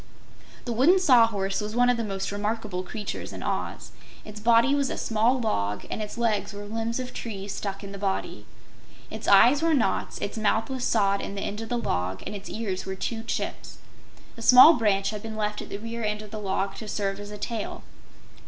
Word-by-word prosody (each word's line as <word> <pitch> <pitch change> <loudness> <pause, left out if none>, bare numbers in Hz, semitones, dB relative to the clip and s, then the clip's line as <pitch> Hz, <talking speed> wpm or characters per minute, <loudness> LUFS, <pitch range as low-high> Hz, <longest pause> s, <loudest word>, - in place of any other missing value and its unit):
The 240 - -2
Wooden 280 +11 +5
Sawhorse 225 - +3
was 210 +1 -5
one 245 0 +4
of 245 - +4
the 230 - -2
most 195 -2 -3
remarkable 205 -2 -2
creatures 205 +2 -6
in - - -7
Oz. - - -3 0.3
Its 210 0 -9
body 235 +5 +4
was 280 -2 +1
a - - -4
small 230 +4 +1
log 105 - -1
and - - -3
its 210 +2 -6
legs 220 -3 0
were 205 0 -7
limbs 225 +3 -3
of 255 -1 -5
trees 200 -3 -5
stuck 195 0 -5
in 200 - -7
the 200 - -8
body. 195 -1 -3 0.6
Its - - -6
eyes 240 +9 +6
were 325 -1 +3
knots, 220 -8 0
its 205 - -4
mouth 220 +3 +1
was 260 -2 -3
sawed 200 -3 +2
in 200 - -6
the 200 - -4
end 210 +2 -4
of 225 - -7
the 245 - 0
log 95 - -2
and 210 - -5
its 200 - -8
ears 200 -4 -3
were 190 0 -5
two 225 +4 -3
chips. 225 - -4 0.6
A - - -8
small 255 +7 +9
branch 200 -6 +1
had 210 -1 -6
been 220 0 -7
left 210 -1 -2
at - - -9
the - - -4
rear 230 +2 -6
end 210 0 -2
of 210 - -12
the 215 - -5
log 195 -1 -1
to 220 - -7
serve 200 -1 -2
as 205 0 -8
a 210 - -7
tail. 220 +1 -4
215 Hz, 220 wpm, -26 LUFS, 200-230 Hz, 0.6 s, small